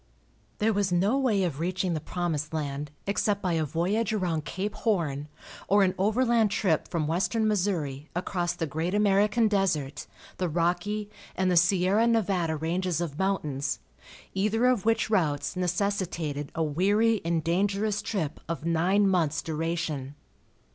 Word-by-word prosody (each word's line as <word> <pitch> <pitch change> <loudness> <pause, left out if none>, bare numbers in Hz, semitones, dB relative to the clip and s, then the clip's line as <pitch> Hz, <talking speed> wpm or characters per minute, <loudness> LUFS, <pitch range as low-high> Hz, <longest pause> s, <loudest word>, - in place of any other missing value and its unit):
There 220 +1 +2
was 200 -2 0
no 190 +7 +2
way 220 -8 +2
of 160 -6 -2
reaching 180 +1 -1
the 155 - -1
promised 160 -2 -3
land 145 -1 -3 0.2
except 200 0 0
by 185 -4 -1
a 160 -1 +1
voyage 180 - 0
around 175 -7 -1
Cape 200 +4 -3
Horn 155 - -1 0.4
or 200 0 +5
an 185 -1 +2
overland 225 +2 +3
trip 185 -6 +1
from 165 -3 -1
western 195 +8 +1
Missouri 170 -9 -1
across 180 -1 -1
the 165 - -3
great 160 +5 -2
American 210 +2 +3
desert, 180 -9 0 0.3
the 180 -2 -1
Rocky 180 +6 -1 0.2
and 185 -1 +1
Sierra 190 +5 +3
Nevada 195 -8 +1
ranges 170 +2 -1
of 165 -4 -4
mountains, 150 -8 -1 0.6
either 215 +5 +1
of 250 -5 +2
which 225 -1 +1
routes 155 -8 +1
necessitated 175 -5 -2
a 165 - +1
weary 205 +8 +2
and 165 -1 0
dangerous 200 +5 0
trip 160 -8 -3
of 165 -1 -4
nine 180 +5 +3
months' 165 -4 +1
duration. 155 -3 -3
180 Hz, 145 wpm, -27 LUFS, 160-205 Hz, 0.6 s, or